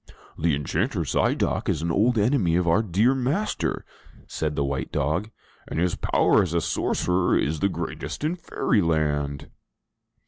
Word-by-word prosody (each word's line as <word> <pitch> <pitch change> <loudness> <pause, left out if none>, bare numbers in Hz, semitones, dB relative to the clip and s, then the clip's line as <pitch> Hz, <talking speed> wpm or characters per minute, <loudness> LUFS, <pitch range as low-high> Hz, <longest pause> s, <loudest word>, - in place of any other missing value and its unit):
"The 80 -2 +1
Enchanter 70 -1 -1
Zidoc - - 0
is 80 - -1
an 85 - 0
old 115 +7 +2
enemy 105 -6 +2
of 90 0 +1
our 85 +6 +4
dear 110 +5 +2
master," 135 +11 -1 0.4
said 75 -1 -3
the 70 - 0
white 70 -1 -3
dog, 80 +10 -1 0.4
"and - - -5
his 90 0 +1
power - - +3
as 85 -2 -2
a 85 - +2
sorcerer 90 +2 +1
is 75 +1 -1
the 100 - +2
greatest 100 - -5
in 160 +4 0
Fairyland!' 75 - -1
85 Hz, 150 wpm, -25 LUFS, 75-110 Hz, 0.4 s, our